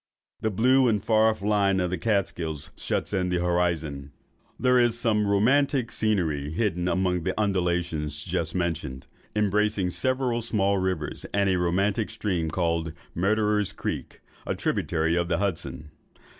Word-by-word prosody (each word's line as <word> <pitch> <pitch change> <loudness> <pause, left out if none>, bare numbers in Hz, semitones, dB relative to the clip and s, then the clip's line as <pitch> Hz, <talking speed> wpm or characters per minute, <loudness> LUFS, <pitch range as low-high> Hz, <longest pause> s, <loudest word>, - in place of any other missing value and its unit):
The 110 - 0
blue 130 +6 +4
and 105 -4 +1
far 110 0 +4
off 110 -3 -3
line 100 -2 +2
of 90 -1 0
the 90 - -1
Kaatskills 85 -8 -1
shuts - - -2
in 90 -2 0
the 90 - +1
horizon. 85 -5 -1 0.5
There 125 0 +4
is 120 -1 +3
some 110 -4 +2
very 105 -1 +1
romantic 130 +3 +2
scenery 85 -11 0
hidden 90 0 -1
among 90 -1 +1
the 95 +4 -2
undulations 85 -7 -1
just 85 -3 -2
mentioned, 80 -7 -2 0.3
embracing 105 -2 +1
several 130 +1 0
small 100 -4 +1
rivers, 95 -6 -3
and 100 -1 +3
a 90 - +1
romantic 95 +5 +1
stream, 95 -7 -2
called 85 -1 -1 0.2
Murderer's 105 +2 +1
Creek, - - -5 0.3
a - - -1
tributary 80 0 0
of 85 -1 0
the 85 -1 +1
Hudson. 75 -7 -3
95 Hz, 150 wpm, -26 LUFS, 85-105 Hz, 0.5 s, blue